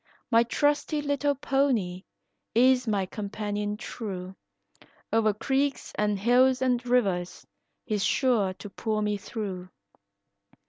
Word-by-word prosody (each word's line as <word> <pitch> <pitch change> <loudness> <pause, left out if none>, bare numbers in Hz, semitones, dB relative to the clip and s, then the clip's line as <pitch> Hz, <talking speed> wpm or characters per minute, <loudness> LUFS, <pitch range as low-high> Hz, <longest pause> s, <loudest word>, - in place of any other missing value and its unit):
My 230 0 +6
trusty 290 +5 +1
little 285 0 0
pony 245 -10 0 0.5
is 255 +1 +4
my 200 -3 +1
companion 205 +1 -4
true, 190 -5 -6 0.8
O'er 220 -1 +4
creeks 270 +6 -1
and 210 -1 0
hills 250 +5 +4
and 250 -2 +1
rivers 195 -8 0 0.4
he's 210 -4 -1
sure 235 -8 +2
to 205 - -9
pull 215 0 -2
me 210 0 0
through. 190 -3 -6
220 Hz, 110 wpm, -27 LUFS, 205-260 Hz, 0.8 s, My